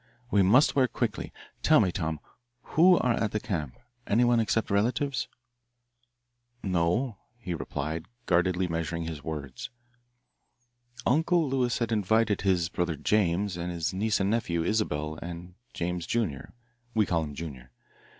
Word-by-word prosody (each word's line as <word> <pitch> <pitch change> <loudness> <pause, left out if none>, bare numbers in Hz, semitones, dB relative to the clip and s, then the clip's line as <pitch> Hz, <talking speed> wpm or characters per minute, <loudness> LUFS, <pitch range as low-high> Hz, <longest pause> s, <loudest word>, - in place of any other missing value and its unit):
We 100 - +4
must 115 +11 +5
work 130 -4 +2
quickly. 115 -4 -2 0.3
Tell - - +5
me, 90 - +2
Tom, 80 -4 -2 0.5
who 180 +3 +7
are 125 - +2
at 110 -2 -1
the 105 - +1
camp 80 -11 -4 0.3
anyone 120 +2 +4
except 110 -1 0
relatives?" 120 +6 +1 1.4
"No," 95 +6 0 0.2
he 100 -7 -5
replied, 80 +2 -4 0.2
guardedly 90 +1 +2
measuring 85 0 -2
his 80 -3 -6
words. 70 -5 -5 1.4
"Uncle 160 +4 +3
Lewis 130 -3 +1
had 115 -1 -1
invited 110 0 +2
his 90 -4 +2
brother 85 -1 -1
James 95 +2 +1
and 90 0 -3
his 85 +1 -2
niece 105 +3 +1
and 100 +1 +1
nephew, 85 -8 0
Isabelle 80 -7 -1
and 85 +1 -7 0.2
James, 85 0 -3
junior 100 - -2 0.4
we 110 -2 +4
call 85 -3 +1
him 75 -2 -6
Junior. 70 -6 -7
90 Hz, 140 wpm, -28 LUFS, 85-115 Hz, 1.4 s, who